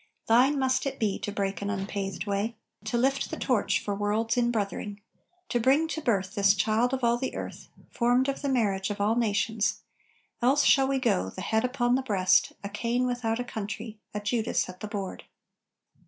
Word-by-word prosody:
Thine 255 +6 +4
must 260 0 +1
it 270 - -4
be 210 -3 0
to 205 - -4
break 200 -1 -2
an 200 - -2
unpathed 195 -2 -3
way, 205 +3 -1 0.3
To 220 +2 -1
lift 270 +3 +1
the - - -5
torch 245 -6 +1
for 205 - -3
world's 210 +3 0
in 240 -1 +2
brothering 205 -1 -3 0.5
To 240 - +1
bring 270 +7 +3
to 320 - -3
birth 200 -8 0
this 200 -1 +4
child 220 +5 +2
of 265 -1 -2
all 235 0 +3
the 260 - -3
earth, - - -7 0.2
Formed 245 +2 +2
of 275 - -2
the 285 - -1
marriage 205 -7 +1
of 205 - -4
all 205 +2 +2
nations; 220 -1 0 0.6
Else 265 +4 +4
shall 270 -1 +5
we 270 0 +1
go, 95 - +1
the - - -8
head 220 0 +1
upon 250 -1 +1
the 260 - +2
breast, 190 -7 +3
A 200 - -4
Cain 235 +4 0
without 240 -2 -1
a - - -1
country, 220 -1 -6
a 210 - -3
Judas 220 +2 0
at 180 0 -10
the 215 - -5
board! 200 -3 -5
225 Hz, 200 wpm, -28 LUFS, 200-250 Hz, 0.6 s, shall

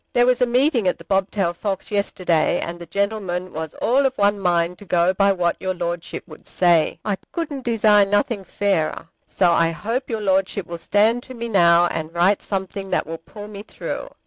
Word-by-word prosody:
There 245 - +4
was 250 0 +2
a 250 - +4
meeting 250 - +2
at 180 - +1
The - - -13
Bobtailed 190 -2 0
Fox 195 0 -4
yesterday, 180 -5 +1
and 170 +1 -5
the 170 - -9
gentlemen 190 -1 -2
was 160 0 -5
all 265 +4 +2
of 265 - -6
one 205 0 +2
mind 175 -1 0
to 205 - -12
go 175 +1 +2
by 200 +1 +3
what 175 -3 0
your 185 0 -2
Lordship 170 -1 -4
would 155 -3 -14
say. 170 -3 +2
I 205 -2 -1
couldn't 295 -6 -4
desire 215 -3 +4
nothing 205 +1 0
fairer. 185 -5 -1 0.2
So 180 -3 +2
I 165 -1 +3
hope 225 - -3
your 225 -2 -2
Lordship 195 -1 0
will 170 0 -7
stand 215 +7 +2
to 255 +1 -11
me 235 0 -5
now, 170 -4 +5
and 160 -2 -3
write 185 +4 +3
something 195 0 -4
that - - 0
will 165 +1 -6
pull 205 +5 -11
me 205 -1 -8
through. 210 - -6
195 Hz, 200 wpm, -21 LUFS, 175-215 Hz, 0.2 s, now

